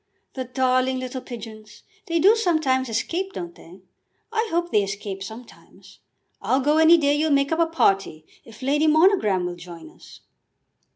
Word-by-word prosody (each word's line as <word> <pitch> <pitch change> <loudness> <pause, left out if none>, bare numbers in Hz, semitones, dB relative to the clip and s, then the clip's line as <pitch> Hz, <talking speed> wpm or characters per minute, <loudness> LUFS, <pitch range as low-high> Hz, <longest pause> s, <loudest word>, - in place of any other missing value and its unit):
"The 260 -1 -5
darling 255 +1 0
little 255 0 -5
pigeons! 220 -3 -11 0.2
They 335 -1 0
do 395 +7 +5
sometimes 310 - 0
escape, 345 - -3
don't 175 -1 -7
they? 180 +3 -16 0.5
I 450 0 0
hope 345 +1 -1
they 210 - +3
escape 195 0 -5
sometimes. 220 +5 -13 0.4
I'll 260 - +1
go 295 +3 +2
any 320 +2 +7
day 285 -3 +2
you'll 305 +2 0
make 280 0 +2
up 320 - 0
a 335 - +3
party, 195 - 0 0.2
if 225 +2 -14
Lady 295 +4 +1
Monogram 310 - +3
will 175 0 -4
join 170 - -11
us." - - -17
260 Hz, 165 wpm, -23 LUFS, 210-320 Hz, 0.5 s, any